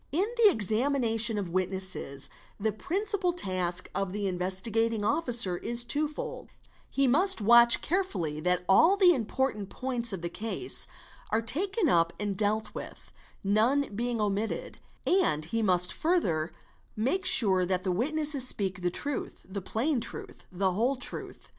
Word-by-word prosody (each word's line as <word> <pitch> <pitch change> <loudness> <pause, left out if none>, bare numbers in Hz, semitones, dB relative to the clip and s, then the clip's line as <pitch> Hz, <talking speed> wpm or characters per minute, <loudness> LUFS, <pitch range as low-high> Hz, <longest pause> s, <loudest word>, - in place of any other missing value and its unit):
— - - -38
In - - +2
the 460 -3 +5
examination 225 - +1
of 195 -4 -4
witnesses 185 -6 -3 0.3
the 220 +2 -1
principal 370 - -1
task 180 - -1
of 195 -2 -3
the 205 0 -3
Investigat 190 +5 -1
ing 215 -2 -3
Officer 235 - +1
is 235 +5 -2
twofold; 295 +5 -2 0.4
he 275 -1 0
must 355 +8 +5
watch 235 +2 +6
carefully 200 - -2
that 180 +2 -1
all 325 - +4
the 365 -3 +5
important 225 - -3
points 245 -3 +1
of 190 -3 -5
the - - -1
case 225 - +1 0.4
are 220 - +1
taken 370 - 0
up 170 - +2
and 205 -1 -3
dealt 215 +2 -1
with, - - -10 0.3
none 220 +6 +1
being 240 +1 -2
omitted; 210 - -3 0.3
and 350 - +1
he 225 +7 -3
must 180 -3 +3
further 180 - -1 0.4
make 265 - -1
sure 190 - +5
that 180 0 -1
the 190 - -1
witnesses 285 - +3
speak 190 -5 -1
the 175 - 0
truth, 285 +10 -5
the 195 +1 -6
plain 245 - -1
truth, - - -10
the 190 +1 -1
whole 235 +9 0
truth. 255 - -6
220 Hz, 155 wpm, -28 LUFS, 190-280 Hz, 0.4 s, watch